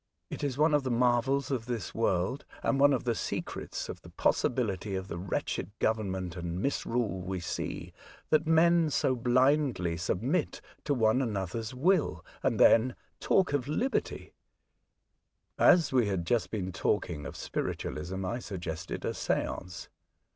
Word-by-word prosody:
It - - -5
is 140 -3 -1
one 155 +1 +4
of 145 - +4
the 130 - -3
marvels 125 +3 +2
of 120 -3 -2
this 120 -5 -4
world, 110 +3 0 0.2
and 135 - +1
one 145 +1 +6
of 135 - +1
the 120 - +1
secrets - - -4
of - - -7
the - - -13
possibility 105 -5 0
of 95 0 -4
the - - -4
wretched 90 0 -2
government 95 -5 -1
and 85 0 -4
misrule 115 -5 -1
we 95 +1 -3
see, 85 - -4 0.4
that 155 0 +3
men 165 0 +4
so 135 -2 +1
blindly 125 - +2
submit 110 - -1 0.3
to 145 - +1
one 115 +1 +3
another's 110 +1 -3
will, 170 +5 +1 0.2
and - - 0
then 120 +2 +5 0.2
talk 185 -6 +2
of 140 -2 0
liberty." 235 - -2 1.3
As 165 -6 +5
we 125 -5 +4
had 95 -3 0
been - - -6
just 120 +3 0 0.2
talking 75 -2 -1
of - - -8
spiritualism, 95 +5 -4
I 120 +7 -2
suggested 85 -7 -5
a - - -1
seance. 90 -1 -3
120 Hz, 150 wpm, -30 LUFS, 95-140 Hz, 1.3 s, one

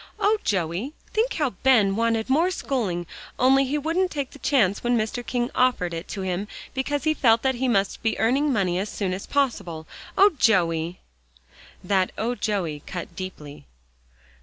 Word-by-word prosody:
"Oh, 430 +1 +3
Joey! 190 - -1 0.2
think 460 +3 +1
how 295 -5 0
Ben 220 -7 +4
wanted 230 0 +1
more 315 +7 +3
schooling, 215 - -2 0.3
only 270 +2 +4
he 280 +3 -1
wouldn't 330 +5 0
take 280 -5 -4
the 285 - -13
chance 250 -9 +2
when 240 0 +2
Mr. 220 +2 -2
King 240 0 -2
offered 250 -9 +1
it 165 +2 -5
to 200 - -5
him 185 +2 -2 0.3
because 280 +2 -2
he 310 -1 +2
felt 230 -6 +3
that 265 0 +2
he 260 +1 -1
must 200 -5 +1
be 225 - 0
earning 270 +6 +2
money 185 -7 +1
as 205 +2 -3
soon 190 -3 -2
as 190 - -6
possible. 180 - -1 0.3
Oh, 400 +2 +7
Joey!" 170 -5 +2 0.8
That 185 0 +1
"Oh, 235 +3 -1
Joey!" 185 -11 -2
cut 180 -2 -6
deeply. 150 - -8
230 Hz, 170 wpm, -24 LUFS, 185-270 Hz, 0.8 s, Oh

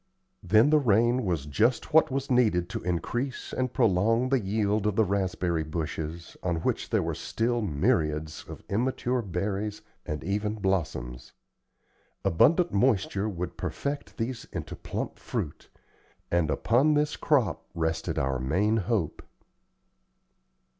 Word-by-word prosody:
Then 110 - +4
the 155 - +6
rain 120 0 +3
was 85 -6 -1
just 115 - +1
what 160 0 +6
was 135 0 -2
needed 105 -9 +3
to - - -4
increase 120 +10 -3
and 130 -1 -1
prolong 115 +6 +2
the 135 -1 +3
yield 105 0 0
of 105 - 0
the 110 - +4
raspberry 90 -3 0
bushes, 80 +1 -5
on 90 -2 0
which - - -1
there - - +2
were - - -2
still 120 +1 -1
myriads 75 -3 0
of - - -9
immature 125 +3 0
berries 100 +1 -3 0.2
and 75 -2 -4
even 105 +3 -1
blossoms. 75 - -2 0.9
Abundant 160 - +4
moisture 100 -2 +2
would 90 -3 -5
perfect 140 +1 -4
these 120 0 -3
into - - -5
plump - - -5
fruit; 75 - -5 0.6
and 85 -3 +2
upon 125 - +3
this 150 +1 +1
crop 140 -9 +1
rested 80 0 -1
our 65 -1 0
main 95 - +1
hope. 105 -5 -1
100 Hz, 135 wpm, -28 LUFS, 85-120 Hz, 0.9 s, the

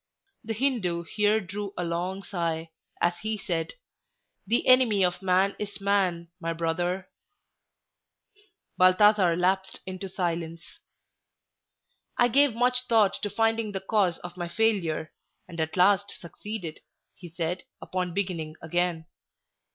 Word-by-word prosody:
The 225 0 -3
Hindoo 210 -9 0
here 210 +4 +2
drew 200 0 -6
a 180 - -1
long 180 +3 -3
sigh, 165 -3 -3 0.3
as 175 - +2
he 220 0 -2
said, 170 -5 -3 0.7
"The 235 +4 +1
enemy 240 -7 +5
of 180 +1 -2
man 190 +1 +2
is 205 -1 -5
man, 190 -4 +1
my 165 -1 -2
brother." 175 +3 -1 1.7
Balthasar 185 -1 +5
lapsed 190 +2 0
into 185 +1 -6
silence. 170 -2 -4 1.4
"I 245 - +4
gave 275 0 +4
much 250 +1 +2
thought 215 -4 +3
to 205 - -2
finding 225 0 0
the 190 - -2
cause 190 -3 +1
of 175 0 -8
my 175 -1 -3
failure, 170 -5 0 0.3
and 170 -2 -5
at 160 +3 -3
last 200 +2 +3
succeeded," 180 -1 -7 0.3
he 175 - -11
said, 175 +2 -3 0.2
upon 180 -2 -3
beginning 170 -6 -2
again. 170 0 -1
185 Hz, 130 wpm, -27 LUFS, 170-210 Hz, 1.7 s, enemy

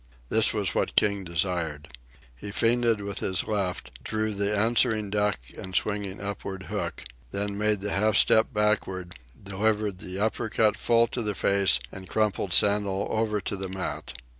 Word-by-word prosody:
This - - +5
was - - 0
what - - -1
King 100 -1 +4
desired. 85 -4 -2 0.5
He - - -8
feinted 115 +1 +1
with 100 -1 -5
his 95 -2 -1
left, 100 -4 -4
drew 110 0 -2
the 100 0 -1
answering 110 -1 +2
duck 105 0 +1 0.2
and 95 0 -8
swinging 100 0 -1
upward 100 -1 -6
hook, - - -5 0.3
then 100 +6 -2
made 105 -1 0
the 105 - -3
half 105 +1 +2
step 110 +4 +5
backward, 105 -5 -1 0.3
delivered 105 0 -1
the 90 +1 -7
upper 110 +2 -1
cut 110 -1 +2
full 115 0 +3
to 120 - -3
the 105 -2 -2
face 100 -10 +3
and 95 -1 -10
crumpled 105 -3 0
Sandel 100 +1 +3
over 110 -1 0
to 100 - -3
the 95 -1 -5
mat. 95 -8 -5
100 Hz, 165 wpm, -26 LUFS, 95-110 Hz, 0.5 s, This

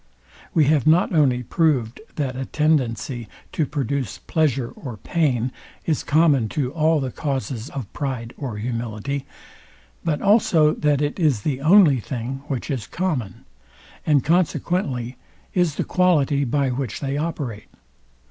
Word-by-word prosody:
We 155 - +5
have 150 -2 +2
not 170 +4 +4
only 130 -6 +3
proved, 135 - +1
that 135 -4 -2
a 130 +1 -3
tendency 130 -6 0 0.2
to 155 - 0
produce 135 -4 -2
pleasure 135 -6 0
or 125 -6 -8
pain 130 - 0 0.3
is 155 -3 0
common 145 -7 +3
to 135 -2 0
all 160 -1 +3
the 130 -2 -3
causes 135 -4 -3
of 125 -7 -7
pride 130 -5 -4
or 125 -7 -5
humility, 120 +4 -3 0.8
but 160 -3 0
also 180 -7 +4
that 150 -1 +1
it 145 +5 -2
is 145 - +2
the 135 -3 -1
only 160 -4 +6
thing, 130 +3 -5
which 135 +1 -3
is 125 -7 -3
common; 140 - -3 0.6
and 145 -4 +3
consequently 150 -6 0 0.4
is 175 -5 +2
the - - -1
quality, 150 -6 +2
by 135 +2 +1
which 125 -3 -3
they 140 -1 -2
operate. 145 -9 -3
140 Hz, 140 wpm, -22 LUFS, 125-155 Hz, 0.8 s, only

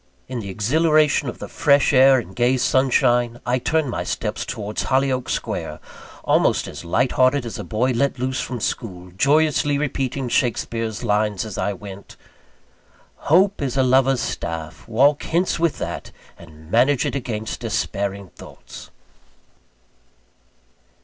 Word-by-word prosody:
In 125 -1 -4
the 100 -3 -6
exhilaration 150 - +2
of - - -8
the - - -7
fresh 140 -1 +3
air 135 0 +7
and 115 -7 -5
the - - -15
gay 125 +3 +2
sunshine, 120 -2 +2
I 125 +1 +1
turned 150 +1 0
my - - -3
steps 105 -1 -3
towards 105 -3 -4
Hollyoake 130 -1 0
Square, - - -3 0.4
almost - - +2
as - - -8
light 125 +9 +1
hearted 130 0 +2
as 115 - -6
a - - -4
boy 120 +4 0
let 135 +3 0
loose 130 +1 -2
from 125 -2 -5
school, 90 -5 -4
joyously 145 - +2
repeating 135 -2 -2
Shakespeare's 115 -2 -1
lines 105 -2 0
as 105 -4 -7
I 100 - -1
went: 100 0 -11 1.1
"Hope 190 +5 +4
is 135 -2 -2
a 130 - +4
lover's 130 0 +3
staff; 80 0 -5
walk 140 +6 +3
hence 170 +1 0
with 170 -2 +1
that, - - -5 0.2
And 80 -1 -15
manage 125 +4 +3
it - - -2
against 110 -5 -4
despairing 100 -1 -3
thoughts." - - -13
125 Hz, 145 wpm, -21 LUFS, 105-140 Hz, 1.1 s, air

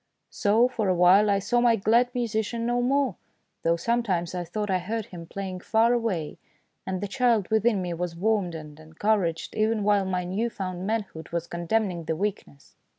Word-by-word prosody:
So, 220 +4 +3
for 230 -5 -2
a 185 - +2
while, 185 +4 +5
I 200 - +3
saw 240 +5 +1
my 240 -1 +5
glad 230 +4 +3
musician 230 -1 -1
no 240 +1 +1
more, 265 -4 +1 0.4
though 165 0 +2
sometimes 185 -3 -1
I 180 -1 -2
thought 205 +4 -3
I 185 - +2
heard 215 +4 -3
him 170 -2 -10
playing 190 -1 -5
far 225 +5 +3
away, 200 -11 -2 0.5
and 190 -1 -2
the 205 - -2
child 230 -2 +1
within 220 -2 +2
me 175 -1 -3
was 170 0 -4
warmed 195 -2 0
and 150 -1 -9
encouraged 165 +2 -1
even 215 0 +1
while 205 -1 +3
my 185 -1 -1
new 200 +7 -1
found 185 -4 -5
manhood 205 -7 -3
was 170 0 -2
condemning 175 0 -1
the 160 - -1
weakness. 190 -6 -5
200 Hz, 185 wpm, -26 LUFS, 175-225 Hz, 0.5 s, while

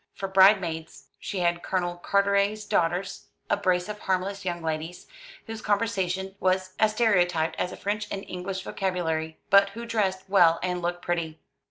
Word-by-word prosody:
For 195 - -4
bride 190 +2 +6
maids 160 -2 -7
she 195 -3 -4
had 175 0 +1
Colonel 175 -2 -1
Carteret's 200 +3 +1
daughters, 175 +3 -1 0.2
a - - +5
brace 185 -2 0
of 210 0 -6
harmless 190 +1 -2
young 175 -2 -3
ladies, 160 +2 -4 0.4
whose 225 -1 -7
conversation 195 -3 -1
was 185 0 0
as 215 -1 +3
stereotyped 175 -8 +2
as 180 - -1
a - - -8
French 210 +1 -2
and 195 - -5
English 185 +1 -5
vocabulary, 160 -5 -2
but 200 0 +6
who 235 - -5
dressed 195 -5 -1
well 175 -4 +5
and 180 -1 -1
looked 175 0 -3
pretty. 165 -2 -2
185 Hz, 165 wpm, -26 LUFS, 175-200 Hz, 0.4 s, bride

